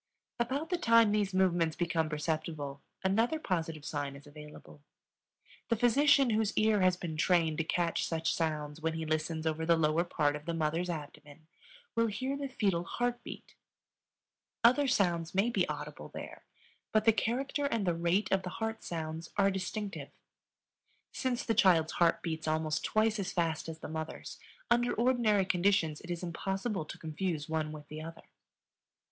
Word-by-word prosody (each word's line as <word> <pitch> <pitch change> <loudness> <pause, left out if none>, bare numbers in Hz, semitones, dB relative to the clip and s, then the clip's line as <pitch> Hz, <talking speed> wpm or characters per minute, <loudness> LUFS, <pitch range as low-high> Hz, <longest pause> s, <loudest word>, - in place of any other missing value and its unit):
About 275 +8 -1
the 355 - +1
time 230 -4 +5
these 205 -2 +1
movements 175 -4 +2
become 165 -2 0
perceptible 150 -2 -3 0.2
another 225 +10 +2
positive 165 - -3
sign 145 -2 -3
is 140 - -13
available. 150 0 -12 0.9
The 230 - +3
physician 270 +3 +4
whose 215 -1 0
ear 215 -2 +4
has 185 -1 +3
been 165 -3 -5
trained 165 -2 +2
to - - +2
catch 170 +1 0
such 165 -1 0
sounds 155 -2 -2
when 160 0 0
he 160 0 -3
listens 155 +1 -1
over 160 0 -1
the 170 +1 +4
lower 160 +1 +2
part 145 -4 0
of 150 0 -8
the 170 - -2
mother's 165 +3 0
abdomen 150 -1 -8 0.5
will 230 0 +3
hear 255 +6 -2
the 280 0 -3
fetal 195 -9 0
heart 245 +6 -2
beat. - - -9 1.1
Other 255 +5 +5
sounds 175 -8 +1
may 205 +5 +3
be 190 -7 +1
audible 150 - -6
there, - - -9 0.5
but 215 -1 +2
the 225 - +6
character 270 +6 -1
and 230 -7 -1
the 175 - +2
rate 175 +4 +1
of 195 - +3
the 180 - -5
heart 225 0 -3
sounds 160 0 -5
are 200 -1 +4
distinctive. 195 +2 -4 1.0
Since 250 -2 -1
the 225 - +1
child's 180 -7 +4
heart 170 -1 +2
beats 160 -2 -3
almost 155 0 0
twice 215 0 +2
as 195 - -2
fast 165 -2 -1
as 160 - -6
the - - -8
mother's, 160 +1 -6 0.3
under 240 0 +3
ordinary 230 -5 +3
conditions 180 -4 +1
it 175 - -12
is 175 0 -3
impossible 190 +2 -2
to - - -8
confuse 160 -1 -3
one 155 -1 -1
with 150 -1 -9
the 155 +1 -7
other. 165 +1 -9
175 Hz, 170 wpm, -32 LUFS, 160-215 Hz, 1.1 s, the